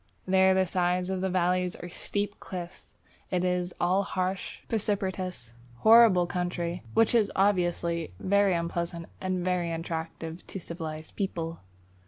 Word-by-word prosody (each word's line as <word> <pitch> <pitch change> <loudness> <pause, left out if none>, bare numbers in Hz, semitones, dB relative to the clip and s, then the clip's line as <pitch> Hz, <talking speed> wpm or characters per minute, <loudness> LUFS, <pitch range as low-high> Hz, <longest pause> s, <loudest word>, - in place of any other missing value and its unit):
There 190 0 +5
the 190 0 +3
sides 180 +1 0
of 190 -1 -2
the 190 - 0
valleys 180 0 +1
are 175 - -8
steep 205 +3 -3
cliffs; 175 -2 -8 0.3
it 180 -1 0
is 180 0 0
all 185 +3 +3
harsh, 185 -1 -3
precipitous, 190 - -2 0.3
horrible 220 -5 +7
country, 175 0 -2
which 225 +1 +4
is 225 -4 +3
obviously 175 - +1
very 200 -1 +3
unpleasant 170 0 -2 0.2
and 185 -1 -1
very 180 -2 0
unattractive 165 0 -5
to 195 - -6
civilized 160 -2 -6
people. 165 -5 -3
180 Hz, 135 wpm, -28 LUFS, 170-190 Hz, 0.3 s, horrible